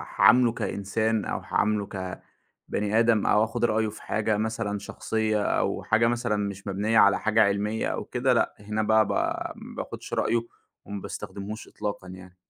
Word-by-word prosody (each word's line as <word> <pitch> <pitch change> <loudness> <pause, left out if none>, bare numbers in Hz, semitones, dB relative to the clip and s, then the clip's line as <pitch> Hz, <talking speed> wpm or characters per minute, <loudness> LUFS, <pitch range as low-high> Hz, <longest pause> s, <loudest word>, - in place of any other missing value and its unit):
هاعامله 125 -1 +6
كإنسان، 110 +1 -1
أو - - -2
هاعامله 105 -1 0
كبَني 100 +3 -4
آدم، 115 -2 +3
أو 105 - +4
آخد 115 +1 0
رأيه 110 -1 +1
في 105 - -11
حاجة 105 0 0
مثلًا 110 -1 -2
شخصية، 110 0 -1
أو - - 0
حاجة 115 +1 +3
مثلًا 120 -2 0
مش 100 -1 -4
مبنية 105 +3 +1
على 100 - +5
حاجة 110 0 +3
علميّة 100 +2 0
أو - - -3
كده، - - +1
لأ - - +1
هنا 105 +1 -2
بقى 110 0 +4
ب - - -3 0.4
ما - - -11
باخدش - - -9
رأيه، 115 +1 +2 0.5
وما 100 -1 -6
باستخدمهوش 105 +2 -7
إطلاقًا 100 -2 -5
يعني. 95 0 -11
105 Hz, 165 wpm, -26 LUFS, 100-110 Hz, 0.5 s, هاعامله